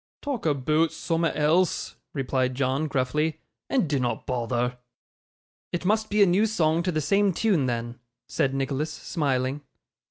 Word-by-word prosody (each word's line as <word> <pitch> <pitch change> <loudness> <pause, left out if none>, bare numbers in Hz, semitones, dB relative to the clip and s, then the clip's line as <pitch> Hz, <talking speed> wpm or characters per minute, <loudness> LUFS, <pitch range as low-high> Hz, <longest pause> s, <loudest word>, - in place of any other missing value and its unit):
'Talk 270 - -2
aboot 150 +3 +2
soom'at 165 -1 -1
else,' 160 +4 +2 0.2
replied 130 -2 0
John, 135 +3 0
gruffly, 150 +4 0 0.3
'and 255 -11 +2
dinnot 130 -4 -1
bother.' 125 0 -1 0.9
'It 175 +1 -3
must 215 +2 +1
be 210 0 +4
a - - +7
new 195 +4 +3
song 165 -6 +2
to 180 +1 -1
the 155 - 0
same 200 +4 +2
tune 175 -8 +2
then,' 120 0 -3 0.3
said 140 -5 0
Nicholas, 135 +3 -1
smiling. 140 -4 -1
150 Hz, 145 wpm, -26 LUFS, 130-175 Hz, 0.9 s, a